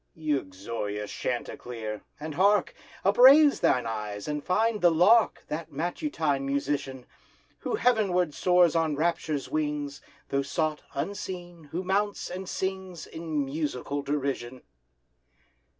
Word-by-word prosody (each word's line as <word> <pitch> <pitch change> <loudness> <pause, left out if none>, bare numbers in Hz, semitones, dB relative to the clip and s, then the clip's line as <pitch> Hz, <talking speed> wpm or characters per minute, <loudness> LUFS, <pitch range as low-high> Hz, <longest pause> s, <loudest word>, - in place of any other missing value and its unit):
Uxorious 105 -7 -3
Chanticleer! 115 -3 -4 0.2
and 155 +1 -5
hark! 200 +4 +3 0.3
Upraise 270 +8 +7
thine 125 -2 +2
eyes, 105 -2 -4
and 150 -1 -3
find 220 +3 +1
the 175 - +6
lark, 195 +8 +4
That 160 +1 -5
matutine 155 - -1
musician, 140 -2 -2 0.5
Who - - -2
heavenward 195 - +2
soars 180 -1 +4
on 160 -2 +1
rapture's 155 -2 -1
wings, 150 -2 -2 0.3
Though 140 - +1
sought, 155 +2 -1
unseen, 175 -4 -5
who 165 +6 -4
mounts, 200 +2 -1
and 185 +1 -6
sings 190 -2 -4
In 160 -3 -3
musical 145 -1 -3
derision. 135 -3 -3
155 Hz, 115 wpm, -28 LUFS, 140-180 Hz, 0.5 s, Upraise